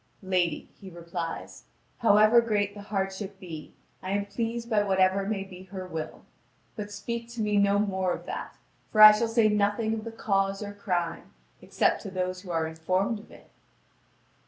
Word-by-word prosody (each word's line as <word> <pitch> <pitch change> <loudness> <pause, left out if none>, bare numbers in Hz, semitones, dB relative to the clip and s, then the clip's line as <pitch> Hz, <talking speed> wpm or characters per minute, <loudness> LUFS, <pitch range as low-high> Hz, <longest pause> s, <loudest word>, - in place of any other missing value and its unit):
"Lady," 180 -4 0
he 195 - -10
replies, 170 -1 -6 0.3
"however 220 0 +6
great 205 -3 0
the 205 - -9
hardship 195 -1 -4
be, 160 -4 -8 0.3
I 185 - -6
am 200 0 0
pleased 230 +3 -3
by 220 -3 +2
what 195 -2 0
ever 190 +1 +3
may 205 -2 -1
be 185 -1 -12
her 190 -1 -7
will. 160 -3 -6 0.5
But 210 -2 -6
speak 235 +3 -5
to 240 - -8
me 210 -1 +1
no 200 0 +4
more 190 -3 0
of - - -4
that; - - -6 0.4
for 215 - -1
I 215 0 +13
shall 215 +2 +1
say 225 -1 +3
nothing 210 +1 +1
of 220 -1 -3
the 230 - -6
cause 195 -2 0
or 205 0 -6
crime, 175 -5 -3 0.3
except - - +1
to 200 - -6
those 185 -1 -3
who 185 - -12
are 165 -2 0
informed 185 +7 -1
of 215 - -15
it." - - -17
200 Hz, 180 wpm, -28 LUFS, 185-215 Hz, 0.5 s, I